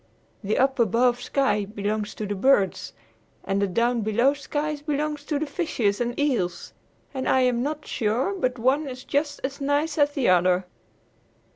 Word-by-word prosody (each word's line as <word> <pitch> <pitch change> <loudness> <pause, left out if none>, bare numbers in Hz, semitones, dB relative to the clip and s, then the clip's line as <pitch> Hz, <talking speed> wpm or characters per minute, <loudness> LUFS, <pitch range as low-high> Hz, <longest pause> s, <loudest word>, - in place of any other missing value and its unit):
The 205 +2 0
up 265 0 +2
above 240 +2 +2
sky 265 -5 +1
belongs 210 +1 -3
to 215 - -4
the 205 - -2
birds 205 -2 +2 0.5
and 195 +1 -1
the 200 - +2
down 235 +5 +1
below 235 +6 +2
sky 295 +1 -3
belongs 295 0 -3
to 300 - -1
the 310 - -1
fishes 250 - -1
and 240 +2 -2
eels. 240 -12 -1 0.4
And 260 -1 -2
I 260 - +4
am 250 -2 +2
not 295 +3 -3
sure 240 - 0
but 255 -10 -1
one 265 +6 +1
is 255 0 -8
just 290 0 -1
as 275 +1 -4
nice 290 +3 0
as 290 0 +3
the 275 -4 0
other." 180 0 +3
255 Hz, 170 wpm, -25 LUFS, 215-290 Hz, 0.5 s, I